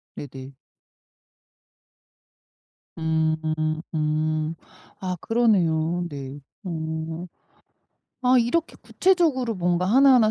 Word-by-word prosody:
네네. 135 -1 -9 2.4
음. 160 -1 0
음. 155 +1 0 0.4
아 185 -1 -2
그러네요. 175 -7 +2
네. 140 -1 -7 0.2
어. 160 -1 -4 1.0
아 255 0 +6
이렇게 280 +8 0
구체적으로 315 - +2
뭔가 175 0 +1
하나하나 250 +1 +6
165 Hz, 150 characters per minute, -24 LUFS, 155-225 Hz, 2.4 s, 아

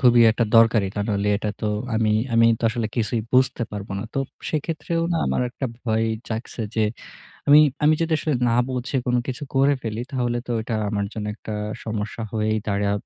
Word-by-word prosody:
খুবই 120 -2 +6
একটা 115 +2 +1
দরকারি। 115 -3 +5
তা - - 0
নইলে 100 -1 0
এটা 105 0 -3
তো 110 - -1 0.3
আমি 110 -1 +2 0.2
আমি 115 0 +6 0.2
আসলে 115 -1 -1
কিছুই 115 0 0
বুঝতে 130 -1 +3
পারব 100 -1 -6
না। - - -3
তো - - 0
উব - - -17 0.2
সেক্ষেত্রেও 165 +2 -2
না - - +1
আমার - - +1
একটা 130 +2 -4 0.2
ভয় 110 -1 +1 0.2
জাগছে 115 +1 -4
যে 110 - +2 0.7
আমি 145 - +9 0.3
আমি 155 +1 +6
যদি 165 -1 +1 0.3
না - - +2 0.2
বুঝে 130 +2 -2
কোন 125 0 +2
কিছু 130 +3 -4
করে 140 +2 +4
ফেলি, 110 0 -3
তাহলে 120 -3 -1
তো - - 0
এটা 115 0 -3 0.2
আমার 100 -1 -1
জন্য 105 -1 -4
একটা 110 - -7 0.3
সমস্যা 110 +1 -4
হয়েই 110 0 0
দাঁড়া 100 0 +1
115 Hz, 190 wpm, -23 LUFS, 110-130 Hz, 0.7 s, আমি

